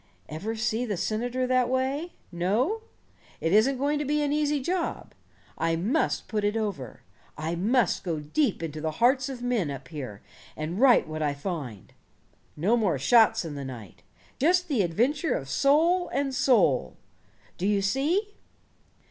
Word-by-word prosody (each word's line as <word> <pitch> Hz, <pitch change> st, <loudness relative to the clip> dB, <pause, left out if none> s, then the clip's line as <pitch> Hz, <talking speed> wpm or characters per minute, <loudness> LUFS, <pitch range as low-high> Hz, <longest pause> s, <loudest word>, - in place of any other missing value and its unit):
Ever 200 Hz, +9 st, -4 dB
see 225 Hz, +1 st, -1 dB
the 210 Hz, -6 st, -2 dB
senator 245 Hz, +6 st, -1 dB
that 255 Hz, -1 st, +2 dB
way? 270 Hz, +6 st, -1 dB, 0.2 s
No? 220 Hz, -, 0 dB, 0.6 s
It 165 Hz, +2 st, 0 dB
isn't 245 Hz, +6 st, +4 dB
going 290 Hz, +3 st, 0 dB
to -, -, -1 dB
be 295 Hz, +1 st, +1 dB
an 290 Hz, 0 st, 0 dB
easy 295 Hz, -1 st, +1 dB
job. 345 Hz, +6 st, -3 dB, 0.5 s
I 165 Hz, 0 st, +1 dB
must 220 Hz, -, 0 dB
put 210 Hz, -2 st, -2 dB
it 205 Hz, +2 st, +1 dB
over. 190 Hz, -, -4 dB, 0.3 s
I 155 Hz, +2 st, -3 dB
must 215 Hz, +5 st, +1 dB
go 165 Hz, -4 st, -2 dB
deep 185 Hz, -, -1 dB
into 155 Hz, -1 st, -5 dB
the 160 Hz, 0 st, -2 dB
hearts 260 Hz, +2 st, +3 dB
of 250 Hz, -2 st, -7 dB
men, 235 Hz, -10 st, 0 dB
up 135 Hz, -2 st, -7 dB
here, 130 Hz, -10 st, -7 dB, 0.3 s
and 160 Hz, +5 st, -4 dB
write 260 Hz, -1 st, +5 dB
what 155 Hz, 0 st, -5 dB
I 145 Hz, -2 st, 0 dB
find. 140 Hz, -, -6 dB, 0.6 s
No 195 Hz, +10 st, +2 dB
more 205 Hz, -10 st, +1 dB
shots 225 Hz, -, +4 dB
in 160 Hz, -, -5 dB
the 140 Hz, -1 st, -6 dB
night. 120 Hz, -8 st, -9 dB, 0.4 s
Just 355 Hz, +4 st, +2 dB
the 260 Hz, -8 st, +2 dB
adventure 245 Hz, -, +1 dB
of 135 Hz, -, -4 dB
soul 325 Hz, -, +3 dB
and 275 Hz, +1 st, -1 dB
soul. 200 Hz, -, +2 dB, 0.6 s
Do 185 Hz, -, 0 dB
you 205 Hz, -1 st, +1 dB
see? 320 Hz, -, 0 dB
220 Hz, 165 wpm, -27 LUFS, 165-270 Hz, 0.6 s, write